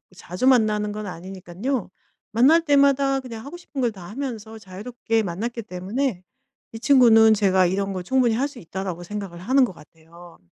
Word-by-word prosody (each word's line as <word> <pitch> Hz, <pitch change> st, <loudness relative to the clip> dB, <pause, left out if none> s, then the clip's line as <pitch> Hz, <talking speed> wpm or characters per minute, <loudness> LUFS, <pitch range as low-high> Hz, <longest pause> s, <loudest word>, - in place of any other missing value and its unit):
자주 180 Hz, +8 st, -3 dB
만나는 215 Hz, -4 st, +3 dB
건 210 Hz, 0 st, -6 dB
아니니깐요. 190 Hz, +6 st, -5 dB, 0.4 s
만날 275 Hz, +9 st, +5 dB
때마다 280 Hz, -2 st, +3 dB
그냥 235 Hz, -3 st, -9 dB
하고 320 Hz, +5 st, -8 dB
싶은 290 Hz, -6 st, -7 dB
걸 240 Hz, -, +1 dB
다 185 Hz, -5 st, -11 dB
하면서 225 Hz, -3 st, -6 dB
자유롭게 220 Hz, +3 st, -3 dB
만났기 225 Hz, +6 st, -4 dB
때문에 195 Hz, +2 st, -3 dB, 0.5 s
이 225 Hz, -, -8 dB
친구는 225 Hz, -4 st, +6 dB
제가 190 Hz, -3 st, +3 dB
'이런 195 Hz, +2 st, -1 dB
걸 185 Hz, -1 st, -5 dB
충분히 255 Hz, -2 st, +2 dB
할 265 Hz, +5 st, 0 dB
수 280 Hz, -4 st, -12 dB
있다.'라고 180 Hz, 0 st, -6 dB
생각을 195 Hz, -2 st, -7 dB
하는 260 Hz, +7 st, +3 dB
것 190 Hz, -, -8 dB
같아요. 165 Hz, +2 st, -17 dB
220 Hz, 365 characters per minute, -23 LUFS, 185-255 Hz, 0.5 s, 친구는